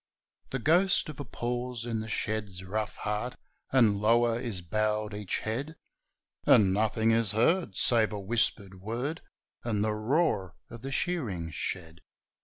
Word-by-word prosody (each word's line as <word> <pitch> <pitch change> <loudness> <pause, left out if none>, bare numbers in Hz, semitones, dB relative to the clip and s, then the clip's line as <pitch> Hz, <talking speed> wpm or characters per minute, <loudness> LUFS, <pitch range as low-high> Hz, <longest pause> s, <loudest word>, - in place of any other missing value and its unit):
The 135 - -2
ghost 175 +8 +3
of 150 - -8
a - - -3
pause 120 0 -3
in 115 -2 -2
the 110 0 -5
shed's 105 -4 -2
rough 105 +3 -3
heart, 105 +4 -3 0.4
And 115 -6 +5
lower 115 +2 +3
is 115 -7 -3
bowed 105 +3 -1
each 105 -2 -2
head; 135 +9 -3 0.7
And 95 -3 +5
nothing 110 +2 +2
is 115 -2 +2
heard, 120 - +2
save 115 0 +4
a 105 - -4
whispered 100 -3 -1
word, 125 - -3 0.4
And 105 -3 0
the 110 0 +1
roar 110 - 0 0.2
of 115 - -9
the 135 +2 -5
shearing 115 - -1
shed. 80 +2 -4
110 Hz, 150 wpm, -29 LUFS, 105-125 Hz, 0.7 s, And